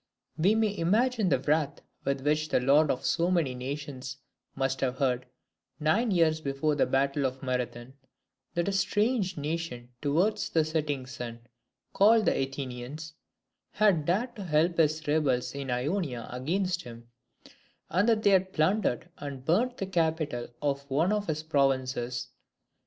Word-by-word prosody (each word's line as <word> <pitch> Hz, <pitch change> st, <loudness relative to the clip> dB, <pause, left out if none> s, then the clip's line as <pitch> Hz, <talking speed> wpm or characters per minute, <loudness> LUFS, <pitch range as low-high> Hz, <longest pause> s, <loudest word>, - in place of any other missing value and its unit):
We 185 Hz, +7 st, +3 dB
may 220 Hz, -2 st, +1 dB
imagine 215 Hz, +4 st, +2 dB
the 135 Hz, -, +4 dB
wrath 150 Hz, 0 st, +1 dB, 0.3 s
with 140 Hz, -1 st, 0 dB
which 150 Hz, +2 st, +1 dB
the -, -, +3 dB
lord 140 Hz, +4 st, +4 dB
of 130 Hz, -, -1 dB
so 170 Hz, +1 st, +2 dB
many 165 Hz, -8 st, +1 dB
nations 135 Hz, 0 st, -6 dB, 0.4 s
must 135 Hz, -1 st, -1 dB
have 130 Hz, -1 st, 0 dB
heard, 125 Hz, -2 st, 0 dB, 0.5 s
nine 180 Hz, +11 st, +2 dB
years 165 Hz, -4 st, +3 dB
before 140 Hz, +1 st, 0 dB
the 145 Hz, -, +2 dB
battle 140 Hz, +1 st, +1 dB
of 130 Hz, 0 st, -2 dB
Marathon, 125 Hz, -1 st, -3 dB, 0.6 s
that 170 Hz, +1 st, 0 dB
a -, -, +1 dB
strange 200 Hz, 0 st, +1 dB
nation 145 Hz, -5 st, -4 dB
towards 185 Hz, +9 st, +1 dB
the 160 Hz, -2 st, +2 dB
setting 150 Hz, -4 st, -2 dB
sun, 120 Hz, -2 st, -7 dB, 0.5 s
called 215 Hz, +2 st, +5 dB
the -, -, +3 dB
Athenians, 135 Hz, +3 st, -4 dB, 0.6 s
had 200 Hz, -8 st, +3 dB
dared 215 Hz, +10 st, 0 dB
to 200 Hz, -, -5 dB
help 170 Hz, 0 st, +1 dB
his 155 Hz, -1 st, +2 dB
rebels 145 Hz, -5 st, +1 dB
in 140 Hz, -1 st, -5 dB
Ionia 125 Hz, -, -2 dB
against 180 Hz, +8 st, -1 dB
him, 120 Hz, -2 st, -12 dB, 0.8 s
and 185 Hz, +7 st, +3 dB
that 220 Hz, -1 st, +2 dB
they 200 Hz, -, +5 dB
had 190 Hz, 0 st, +3 dB
plundered 170 Hz, -, +1 dB
and 140 Hz, -3 st, -7 dB
burnt 240 Hz, -, +2 dB
the 195 Hz, -, -2 dB
capital 160 Hz, -8 st, -1 dB, 0.2 s
of 140 Hz, -1 st, 0 dB
one 160 Hz, +9 st, +2 dB
of 210 Hz, -1 st, -1 dB
his 155 Hz, -1 st, -2 dB
provinces. 130 Hz, -4 st, 0 dB
150 Hz, 150 wpm, -29 LUFS, 135-180 Hz, 0.8 s, called